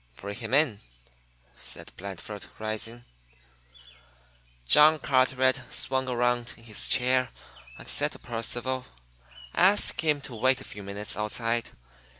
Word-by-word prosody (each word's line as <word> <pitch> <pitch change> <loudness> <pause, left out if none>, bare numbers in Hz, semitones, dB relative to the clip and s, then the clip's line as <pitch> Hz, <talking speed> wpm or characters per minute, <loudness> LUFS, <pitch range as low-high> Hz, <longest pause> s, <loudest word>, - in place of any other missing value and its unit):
"Bring 100 +7 -6
him 115 -2 -6
in," 135 -7 +4 0.8
said - - -8
Blandford, 100 +2 -7
rising. 110 +2 -4 1.6
John 150 - +7
Carteret 130 -2 +2
swung 130 0 -1
around 120 0 0
in 115 - -17
his 110 -3 -2
chair 130 0 +2 0.5
and - - -11
said - - +2
to - - -10
Percival: 120 +2 -3 0.7
"Ask 195 +4 +4
him 150 -2 +2
to 135 -2 -7
wait 130 +3 +2
a - - -10
few 105 - -9
minutes 100 +1 -4
outside. 115 +2 -1
120 Hz, 125 wpm, -28 LUFS, 110-130 Hz, 1.6 s, John